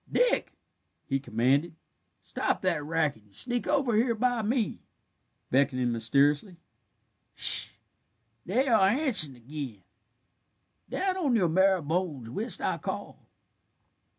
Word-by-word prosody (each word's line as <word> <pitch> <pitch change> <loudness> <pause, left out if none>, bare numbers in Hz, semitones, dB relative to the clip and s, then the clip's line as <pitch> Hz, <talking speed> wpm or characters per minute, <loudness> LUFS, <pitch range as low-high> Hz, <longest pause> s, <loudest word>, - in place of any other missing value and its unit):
Dick," - - +1 0.5
he 135 -1 -1
commanded, 135 +6 0 0.5
"stop - - -2
that 150 - 0
racket, 155 -6 -1
and 105 -1 -21
sneak 245 -1 -1
over 275 -6 +1
here 230 +2 +2
by 245 +1 0
me," 220 0 -1 0.7
beckoning 130 -2 +2
mysteriously. 140 - +1 0.8
"Sh - - +3
h - - -13
h! - - -23 0.7
they 250 +9 +1
are 220 -6 +4
answerin' 215 - +3
ag'in. 125 -4 -8 1.1
Down 380 -1 -1
on 290 -9 +1
your 185 -7 +2
marrow 190 +1 +3
bones 150 -7 -3
whilst 220 - -4
I - - -1
call." - - -7
170 Hz, 125 wpm, -28 LUFS, -, 1.1 s, are